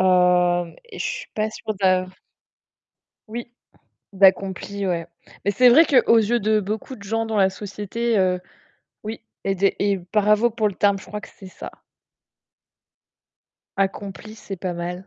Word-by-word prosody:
Heu, 180 -2 +3
et 455 -4 -12
je - - -1
suis - - -4
pas 215 0 -1
sûre 215 0 -5
de 185 -1 +3 1.2
Oui, 235 +2 -6 0.6
d'accompli, 195 +1 +2
ouais. 170 -2 -2 0.4
Mais 200 - +3
c'est 250 +5 +6
vrai 315 +7 +7
qu'aux 245 -4 +5
yeux 225 +2 +2
de 215 0 +2
beaucoup 215 +6 -5
de 200 - -13
gens 225 +3 -1
dans 220 -1 -2
la 190 -1 +4
société, 210 +3 -3
heu 185 -1 +2 0.6
oui 220 +2 -6 0.2
et 195 - 0
de 195 +1 +3
et 200 -1 +1 0.2
bravo 210 +2 +4
pour 220 -2 0
le - - -8
terme, 200 0 +3
je - - -13
crois 210 0 -6
que 220 - -11
c'est 195 - -11
ça. 185 - -9 2.1
Accompli, 195 +2 -3
c'est 200 -2 -8
pas 180 0 -3
mal. 175 +2 -5
200 Hz, 160 wpm, -22 LUFS, 185-220 Hz, 2.1 s, vrai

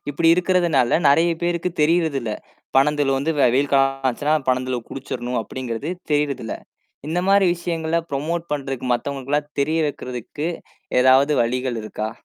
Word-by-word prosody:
இப்படி 165 +3 +2
இருக்கறதுனால, 175 -7 +2
நிறைய 165 +5 +4
பேருக்குத் 175 0 -2
தெரியறது 160 -2 +2
இல்ல. 115 -2 -4 0.5
பனந்தெளுவு 140 -1 +3
வந்து 150 +4 0
வெ 135 - +5
வெயில் 140 +2 +1
காலம் 135 0 +2
ஆச்சுனா 145 +5 0
பனந்தெளுவ 130 -1 0
குடிச்சுடனும் 125 -2 -4
அப்படிங்கறது 125 +5 -5 0.2
தெரியறது 145 -2 0
இல்ல. - - -4 0.5
இந்த 170 - -1
மாதிரி 195 -1 +5
விஷயங்களை 170 -1 -1
ப்ரமோட் 165 +5 -2
பண்றதுக்கு, 135 -3 -3
மத்தவங்களுக்கெல்லாம் 140 +3 -2
தெரிய 155 +3 +1
வைக்கிறதுக்கு, 125 +3 -5 0.5
ஏதாவது 130 +3 +5
வழிகள் 125 0 -2
இருக்கா? 110 0 -4
140 Hz, 135 wpm, -21 LUFS, 130-165 Hz, 0.5 s, வெ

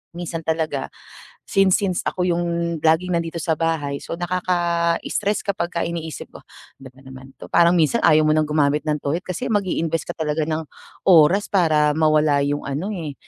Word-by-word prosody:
minsan 165 -2 -5
talaga 155 -4 -2 0.5
since 195 -1 +3
since 185 -3 -1
ako 180 -1 -1
yung 170 -1 -1
laging 165 +3 +2
nandito 170 0 -2
sa 160 0 0
bahay, 155 -4 -2
so - - -6
nakaka-stress 175 +2 -1
kapagka 175 -4 -2
iniisip 165 -2 -6
ko, - - -12 0.4
ano 135 - -10
ba 130 - -22
naman 130 0 -11
'to. - - -10
Parang 170 0 +4
minsan 165 +8 +2
ayaw 155 -2 +4
mo 155 - +3
ng 155 -1 +1
gumamit 150 -1 +1
ng 150 - +1
toilet 160 +6 -2
kasi 185 +8 -4
mag-i-invest 165 -5 -1
ka - - -4
talaga 155 0 -1
ng 160 0 -2 0.4
oras 180 +3 +5
para 155 -6 +3
mawala 155 -2 +2
yung 145 +1 -2
ano, 145 +9 -3
eh, 160 -6 -5
165 Hz, 170 wpm, -21 LUFS, 150-175 Hz, 0.5 s, oras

